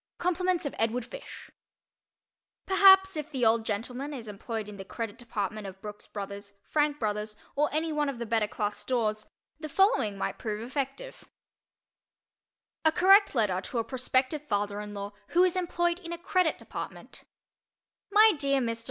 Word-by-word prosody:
_ - - -65
COMPLIMENTS 360 -1 0
OF 285 - -3
EDWARD 230 +2 0
FISH - - -10 1.1
Perhaps, 385 -1 +6
if 300 -1 -4
the 260 -5 0
old 225 0 +4
gentleman 250 +7 -4
is 235 -4 -7
employed 215 +1 -5
in 210 -1 -9
the 195 - -6
Credit 225 +2 -5
Department 215 -3 -4
of 190 0 -10
Brooks 210 +1 -9
Brothers, 200 0 -7
Frank 295 +2 +1
Brothers, 210 -2 -2 0.2
or 295 +2 +2
any 315 +2 0
one 295 -1 +1
of 270 - -5
the 235 - -4
better 220 -1 +1
class 210 0 -2
stores, 215 -4 -1 0.3
the 310 -1 -6
following 340 - +3
might - - -3
prove 215 -2 -3
effective: 275 - -5 1.6
A 315 - +5
Correct 390 +2 +5
Letter 200 -6 +2
to 240 - -5
a 230 - +1
Prospective 260 +3 0
Father 205 0 -1
in 210 0 -8
Law 200 0 -5 0.2
Who 360 - +8
Is 370 -1 +2
Employed 345 -1 0
in 340 -2 -8
a 340 - -3
Credit 355 -1 +1
Department - - -8 0.9
MY 430 +1 +7
DEAR 275 -1 +2
MR. 230 -2 -1
250 Hz, 170 wpm, -29 LUFS, 210-325 Hz, 1.6 s, Who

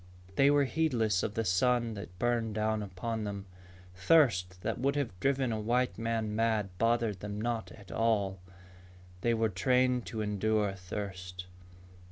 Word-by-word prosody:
They 140 +5 +5
were 145 0 +4
heedless 120 - +1
of 105 - -3
the 115 - 0
sun 115 +5 +2
that 100 -3 -9
burned 115 -1 0
down 110 0 0
upon 105 +3 -4
them. 100 -1 -5 0.5
Thirst 90 - +3
that 110 +2 -2
would 140 +3 +1
have 140 -6 -1
driven 135 +1 +1
a 110 - -1
white 120 +4 0
man 115 -2 -1
mad 110 -4 0
bothered 115 -3 +1
them 105 +1 -5
not 115 0 -2
at 100 -3 -13
all. 100 -4 +1 0.8
They 120 +2 +2
were 115 0 +2
trained 125 +5 +2
to 110 - -4
endure 105 0 +1
thirst. 90 -1 -6
110 Hz, 155 wpm, -31 LUFS, 100-120 Hz, 0.8 s, They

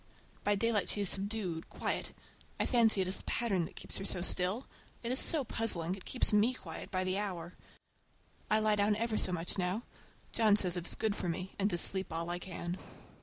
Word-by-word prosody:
By 205 - +2
daylight 215 -1 0
she 205 - -1
is 200 - +7
subdued, 195 -4 -1
quiet. - - -3 0.5
I - - +1
fancy 225 -5 +4
it 185 - -1
is 185 - +2
the - - -13
pattern 195 -8 0
that - - -12
keeps - - -4
her - - -5
so 180 -3 -2
still. 185 +7 0 0.4
It 235 - -3
is 255 - +3
so 315 -4 +9
puzzling. 185 -8 -1
It 190 - -9
keeps 250 - +1
me 220 +5 +3
quiet 165 -9 -9
by 185 -1 -1
the 185 +1 0
hour. 180 -4 -5 1.0
I 215 - +4
lie 215 -1 +2
down 205 +1 +2
ever 225 +1 -2
so 185 - +1
much 175 +2 -3
now. 185 +6 -1 0.5
John 220 -3 +4
says 185 -3 +4
it 175 -1 -4
is - - 0
good 215 -2 -1
for 180 - -3
me, 185 +3 -4
and 200 +1 +2
to 175 - -1
sleep 190 +1 -3
all 165 +1 -2
I 175 - -2
can. 175 0 -6
195 Hz, 220 wpm, -32 LUFS, 180-215 Hz, 1.0 s, so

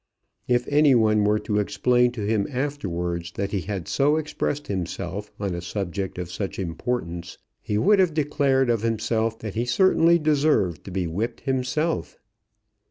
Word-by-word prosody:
If 125 0 +1
any 145 -2 +5
one 110 -2 +3
were 105 +1 +3
to 105 -1 -1
explain 120 +5 +2
to 110 -4 -4
him 105 -1 +1
afterwards 90 - -3
that 100 0 -3
he 100 - -1
had 95 -2 -5
so 145 +2 +2
expressed 150 -1 -2
himself 95 +2 -4
on 100 -3 -2
a 85 - -4
subject 95 +1 -4
of 90 -1 -5
such 95 +1 -4
importance, 85 -1 -4 0.2
he 105 - -2
would 200 - +4
have 180 -5 +3
declared 140 -4 +2
of 115 -3 0
himself 115 0 0
that 110 -3 -5
he 115 - -1
certainly 170 +5 +4
deserved 150 - +1
to 95 - -7
be 90 -1 -1
whipped 110 +8 -3
himself. 135 +5 -1
110 Hz, 165 wpm, -24 LUFS, 95-140 Hz, 0.2 s, any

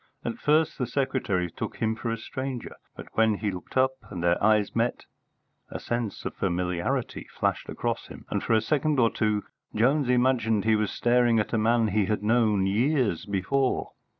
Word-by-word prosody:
At 235 - -3
first 155 +1 +2
the 125 - -1
secretary 115 - -1
took - - -5
him 110 0 0
for 115 +1 -4
a 115 - -1
stranger, 130 +2 -5 0.2
but - - -10
when 110 -1 +3
he 105 0 -2
looked 90 +7 -7
up 130 0 +4 0.2
and 85 -2 -5
their 85 +2 +2
eyes 105 -1 +3
met, 115 +1 0 0.6
a - - -6
sense 120 -3 -3
of - - -3
familiarity 90 -2 -2
flashed - - -1
across - - -3
him, - - -12
and - - 0
for - - 0
a 110 - +4
second 150 +4 +1
or 115 -2 +4
two 105 -2 0 0.3
Jones 130 +5 +2
imagined 120 -4 +2
he 110 0 +4
was 105 -1 0
staring 120 -1 +3
at 105 - -2
a - - +3
man 115 0 +2
he 105 0 +1
had 105 0 -1
known 110 -3 +3
years 115 - +1
before. 115 +8 0
115 Hz, 185 wpm, -26 LUFS, 105-125 Hz, 0.6 s, up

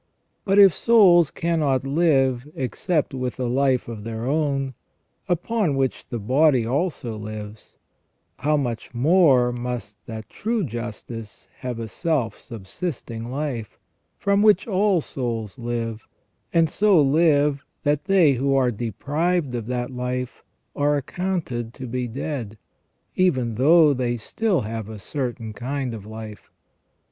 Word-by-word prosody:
But 195 -1 +2
if 195 -4 +8
souls 185 -9 +5
cannot 150 -6 0
live 135 -4 +2
except 145 +4 -1
with 130 -1 -4
a 125 - -1
life 130 +1 +1
of 110 -3 -7
their 115 +1 -5
own, 140 -2 0 0.6
upon 175 -1 0
which 135 -1 -1
the 120 - -3
body 130 +3 +3
also 130 -3 -2
lives, 105 0 -8 0.6
how 150 +3 +1
much 120 -3 -4
more 135 -3 +4
must 120 -4 -5
that 110 -2 -7
true 225 -1 -2
justice 115 -3 -7
have 125 -2 -4
a 115 - -4
self 135 - -1
subsisting 115 - -6
life, 130 -5 -4 0.4
from 200 0 +2
which 210 -3 +5
all 195 -3 +2
souls 115 -8 -4
live, 115 -2 -4 0.4
and 165 -1 +4
so 200 +2 +3
live 145 -1 +3 0.2
that 145 +2 +1
they 185 -7 +5
who 135 +2 +1
are 130 -2 +3
deprived 140 - -1
of 115 -3 -4
that 125 0 -2
life 125 0 -4 0.3
are 145 0 +2
accounted 140 -7 -3
to 130 - -7
be 125 0 -3
dead, 120 -3 -5 0.6
even 130 -11 +2
though 150 +5 +5
they 125 -2 -1
still 185 - 0
have 110 0 -5
a 110 - -7
certain 120 -1 -4
kind 130 +2 -3
of 105 -2 -8
life. 110 -1 -9
130 Hz, 135 wpm, -23 LUFS, 115-155 Hz, 0.6 s, if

